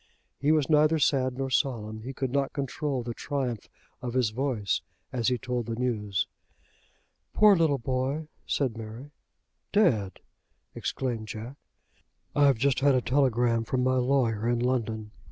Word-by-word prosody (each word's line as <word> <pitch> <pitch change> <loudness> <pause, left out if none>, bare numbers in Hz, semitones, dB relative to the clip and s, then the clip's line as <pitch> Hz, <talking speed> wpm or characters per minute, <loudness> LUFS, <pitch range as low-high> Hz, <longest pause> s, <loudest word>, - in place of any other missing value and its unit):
He 145 +2 +2
was 155 -3 +3
neither 155 +1 +4
sad 130 -4 +1
nor 135 -1 -2
solemn. 110 -5 -1
He 125 +4 -6
could 135 -1 -3
not 140 0 0
control 140 -1 -2
the 120 0 -4
triumph 125 -5 -3 0.3
of 125 0 -4
his 125 -5 +2
voice 115 -5 -1 0.3
as 120 -3 0
he 125 -1 +2
told 125 -2 -3
the 115 - -2
news. 105 -6 -1 1.1
"Poor 210 -2 +7
little 160 -5 +3
boy!" 130 +4 -2 0.2
said 130 -5 0
Mary. 115 +5 -8 0.6
"Dead!" 120 - +2 0.5
exclaimed 120 -5 -3
Jack. 110 +5 -7 0.8
"I've 140 -3 +5
just 135 +2 +2
had 140 -1 +4
a 130 - +2
telegram 120 -3 +2
from 125 +2 -1
my 130 0 +2
lawyer 125 -4 +1
in 120 - +2
London. 115 -3 -1
125 Hz, 150 wpm, -28 LUFS, 115-140 Hz, 1.1 s, Poor